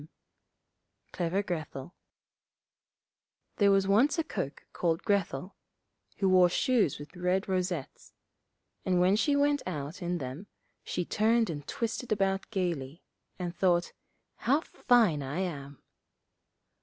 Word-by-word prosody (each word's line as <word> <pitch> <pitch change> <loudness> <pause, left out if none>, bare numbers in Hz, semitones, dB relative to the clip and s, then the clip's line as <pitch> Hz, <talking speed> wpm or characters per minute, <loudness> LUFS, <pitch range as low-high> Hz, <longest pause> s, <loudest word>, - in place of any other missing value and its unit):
}] - - -48
Clever 180 +3 0
Grethel 160 -5 -5 1.6
There 200 -1 +5
was 195 -1 +3
once 235 - +4
a 325 - +1
cook 140 - -5
called 165 -2 0
Grethel, 190 -3 -1 0.6
who 195 - +1
wore 185 -1 +6
shoes 230 - +2
with 145 +3 -11
red 180 +2 0
rosettes; 180 -6 -3 0.7
and 180 -1 +2
when 185 +2 +4
she 285 +7 +2
went 285 0 +2
out 155 +1 -5
in 175 0 -1
them, 140 +7 -6 0.4
she 180 - -2
turned 225 0 +2
and 145 -2 -7
twisted 230 +1 -3
about 195 -2 0
gaily, 170 -7 -3 0.3
and 175 -1 -4
thought, 175 -2 +2 0.4
'How 280 +5 +2
fine 225 - +2
I 140 +7 -3
am!' 140 -6 -5
185 Hz, 125 wpm, -30 LUFS, 165-205 Hz, 1.6 s, wore